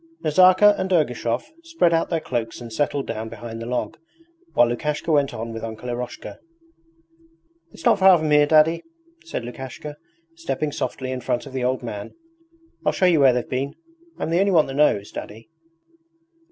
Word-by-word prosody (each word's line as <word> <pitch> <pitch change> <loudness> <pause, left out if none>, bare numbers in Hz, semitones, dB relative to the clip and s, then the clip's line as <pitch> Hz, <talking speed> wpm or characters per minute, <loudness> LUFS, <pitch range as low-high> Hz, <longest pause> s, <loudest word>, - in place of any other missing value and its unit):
Nazarka 185 +6 +6
and 190 0 -2
Ergushov 125 -8 0 0.2
spread 330 - +1
out 165 - +1
their 165 - 0
cloaks 120 -6 -4
and 120 -2 -9
settled 145 +2 -1
down 110 0 -5
behind 115 0 -8
the 115 - -6
log, 125 +5 -3 0.6
while 120 - +5
Lukashka 150 +6 -2
went 145 -3 +2
on 115 +1 -6
with 115 0 -7
Uncle 115 +2 -6
Eroshka. 120 0 -6 1.3
'It's - - -13
not 225 -4 +4
far 190 -1 +7
from 155 -2 -2
here. 150 0 +5
Daddy,' 155 +2 +4 0.4
said 335 - -5
Lukashka, 130 +4 -8 0.4
stepping 330 - -3
softly 130 -2 -4
in 130 -1 -4
front 125 +1 -2
of 135 - -11
the 130 -1 -2
old 130 0 -1
man; 105 -4 -7 0.7
'I'll - - +1
show 185 - +1
you 175 -4 +4
where 135 -2 +6
they've 125 -1 -2
been 135 +2 -3 0.4
I'm - - -3
the 170 - +2
only 200 +1 +3
one 160 -4 +5
that 135 - -7
knows. 135 -8 +2
Daddy.' 110 +8 -9
135 Hz, 180 wpm, -23 LUFS, 120-165 Hz, 1.3 s, far